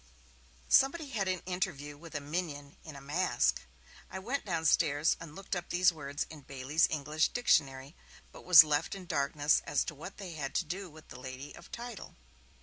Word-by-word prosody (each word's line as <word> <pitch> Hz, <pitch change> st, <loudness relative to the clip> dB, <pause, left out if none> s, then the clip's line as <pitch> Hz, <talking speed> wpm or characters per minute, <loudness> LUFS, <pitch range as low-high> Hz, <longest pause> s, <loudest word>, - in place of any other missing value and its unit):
Somebody 280 Hz, +2 st, +4 dB
had 205 Hz, -6 st, -1 dB
an 185 Hz, -1 st, -1 dB
interview 175 Hz, -6 st, -3 dB
with 160 Hz, +1 st, -12 dB
a -, -, 0 dB
'minion' 145 Hz, -2 st, -5 dB
in 155 Hz, -3 st, -10 dB
a 140 Hz, -, -9 dB
'mask'; 145 Hz, -2 st, +1 dB, 0.5 s
I -, -, -6 dB
went 245 Hz, +9 st, -3 dB
downstairs 160 Hz, -3 st, +2 dB
and 165 Hz, -2 st, -10 dB
looked 195 Hz, 0 st, -4 dB
up 175 Hz, -1 st, -5 dB
these 180 Hz, 0 st, +4 dB
words 145 Hz, -2 st, -4 dB
in 155 Hz, -2 st, -10 dB
Bailey's 135 Hz, +3 st, +1 dB
'English 155 Hz, +1 st, 0 dB
Dictionary', 140 Hz, -, +1 dB, 0.4 s
but -, -, -13 dB
was 175 Hz, -4 st, +10 dB
left 150 Hz, +4 st, -1 dB
in 190 Hz, -2 st, -9 dB
darkness 145 Hz, -2 st, +1 dB
as -, -, +1 dB
to -, -, -5 dB
what 155 Hz, +6 st, -9 dB
they 195 Hz, -4 st, -7 dB
had 145 Hz, -3 st, -5 dB
to 180 Hz, -, +1 dB
do 185 Hz, +4 st, -5 dB
with 155 Hz, 0 st, -16 dB
the -, -, -10 dB
lady 130 Hz, +2 st, -8 dB
of -, -, -14 dB
title. 240 Hz, -3 st, -8 dB
160 Hz, 185 wpm, -31 LUFS, 145-185 Hz, 0.5 s, was